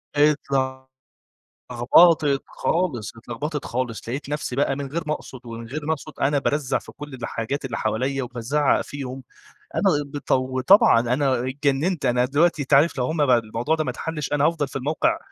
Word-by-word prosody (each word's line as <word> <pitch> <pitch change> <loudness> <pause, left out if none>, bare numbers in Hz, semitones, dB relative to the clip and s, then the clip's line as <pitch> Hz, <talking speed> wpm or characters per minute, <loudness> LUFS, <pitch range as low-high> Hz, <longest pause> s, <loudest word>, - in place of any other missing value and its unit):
اتل 145 -2 +2 1.2
لغبطت 145 +3 +5
خالص، 140 - -2
اتلغبطت 140 +6 -5
خالص 120 -2 -4
لقيت 135 +3 -4
نفسي 145 -4 -3
بقى 135 -1 +1
من 140 -1 -4
غير 160 +5 -3
ما 150 - 0
أقصد 130 - -10
ومن 115 0 -7
غير 150 +3 -5
ما 160 - +1
أقصد 155 0 -5
أنا 145 +1 +2
بارزع 145 -1 0
في - - -13
كل 145 -2 -9
الحاجات 125 +3 -4
اللي 120 - -3
حواليّا، 130 +5 -1
وبازعّق 125 +4 0
فيهم 135 -2 -7 0.5
،أنا - - 0 0.2
بطو 135 -2 -1
وطبعًا 130 - +6
أنا 125 +1 0
اتجننت 140 +3 0
أنا 125 0 +3
دلوقتي 150 +3 +2
أنت 140 +1 -2
عارف 145 +2 +5
لو 125 - +1
هم 155 +1 +1
بقى 125 -2 +5
الموضوع 115 +7 -1
ده 155 - -1
ما - - -3
اتحلّش 155 -3 -5
أنا 145 0 +3
هأفضل 160 -4 +1
في - - -14
الموقع 160 - 0
140 Hz, 175 wpm, -23 LUFS, 125-150 Hz, 1.2 s, وطبعًا